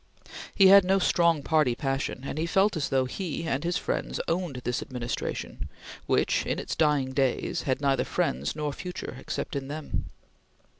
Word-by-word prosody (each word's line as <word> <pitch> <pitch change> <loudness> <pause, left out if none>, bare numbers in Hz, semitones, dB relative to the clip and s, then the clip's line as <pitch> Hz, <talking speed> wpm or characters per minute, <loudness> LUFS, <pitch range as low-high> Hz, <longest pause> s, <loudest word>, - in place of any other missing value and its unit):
He 195 -2 +7
had 200 0 +9
no 190 +2 +3
strong 170 -5 +3
party 150 -6 +2
passion, 135 -1 -2
and 140 - -4
he 165 - 0
felt 195 +3 +3
as 155 - -1
though 130 -1 +2
he 165 +4 -4
and 145 -3 -1
his 175 0 0
friends - - -2
owned 170 -4 -1
this 125 - -1
administration, 120 -2 -4 0.4
which, - - +2
in - - -2
its - - -4
dying 145 -4 +2
days, 130 -2 0
had 130 +2 +1
neither 135 -1 +2
friends 65 - -1
nor 150 -2 -2
future 180 +3 -6
except - - -4
in 135 -1 -3
them. 150 +1 -4
150 Hz, 170 wpm, -27 LUFS, 135-170 Hz, 0.4 s, had